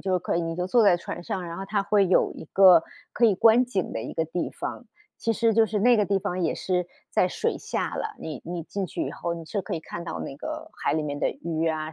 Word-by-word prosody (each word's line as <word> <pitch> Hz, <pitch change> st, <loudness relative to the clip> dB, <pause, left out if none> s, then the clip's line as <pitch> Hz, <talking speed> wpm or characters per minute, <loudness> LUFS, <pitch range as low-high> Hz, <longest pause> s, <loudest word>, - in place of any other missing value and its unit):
就 185 Hz, -2 st, +1 dB
可 -, -, -2 dB
以 -, -, +1 dB
你 165 Hz, 0 st, -3 dB
就 180 Hz, 0 st, -1 dB
坐 235 Hz, +4 st, +4 dB
在 195 Hz, -4 st, +6 dB
船 175 Hz, -, -7 dB
上， 180 Hz, 0 st, -4 dB
然 170 Hz, 0 st, -6 dB
后 195 Hz, -, -5 dB
它 200 Hz, -1 st, 0 dB
会 200 Hz, -1 st, +3 dB
有 185 Hz, -, +3 dB
一 -, -, -9 dB
个 185 Hz, -4 st, +8 dB, 0.3 s
可 240 Hz, -, +2 dB
以 210 Hz, -4 st, +5 dB
观 230 Hz, +4 st, +5 dB
景 200 Hz, -7 st, -2 dB
的 -, -, -3 dB
一 -, -, -6 dB
个 160 Hz, -, 0 dB
地 165 Hz, +2 st, -3 dB
方， 245 Hz, -, -6 dB, 0.3 s
其 230 Hz, -, 0 dB
实 225 Hz, 0 st, +2 dB
就 225 Hz, -, +6 dB
是， 210 Hz, 0 st, -1 dB
那 240 Hz, +3 st, +5 dB
个 210 Hz, -, +3 dB
地 195 Hz, -1 st, +2 dB
方 180 Hz, -1 st, -3 dB
也 -, -, +1 dB
是 180 Hz, -2 st, -1 dB, 0.2 s
在 185 Hz, -, +3 dB
水 -, -, -1 dB
下 -, -, -3 dB
了， 435 Hz, -1 st, -4 dB
你 155 Hz, -, -6 dB
你 175 Hz, -1 st, -4 dB
进 200 Hz, +3 st, -3 dB
去 -, -, -3 dB
以 -, -, -4 dB
后， 170 Hz, -, -3 dB
你 165 Hz, -, -8 dB
是 200 Hz, +5 st, -3 dB
可 195 Hz, -, -4 dB
以 160 Hz, -, -4 dB
看 170 Hz, -, -7 dB
到 165 Hz, -, -5 dB
那 135 Hz, -, -5 dB
个 -, -, -6 dB
海 140 Hz, -, +2 dB
里 155 Hz, -, 0 dB
面 145 Hz, -1 st, -4 dB
的 -, -, +2 dB
鱼 165 Hz, -1 st, -2 dB
啊 155 Hz, 0 st, -3 dB
180 Hz, 295 characters per minute, -26 LUFS, 165-205 Hz, 0.3 s, 个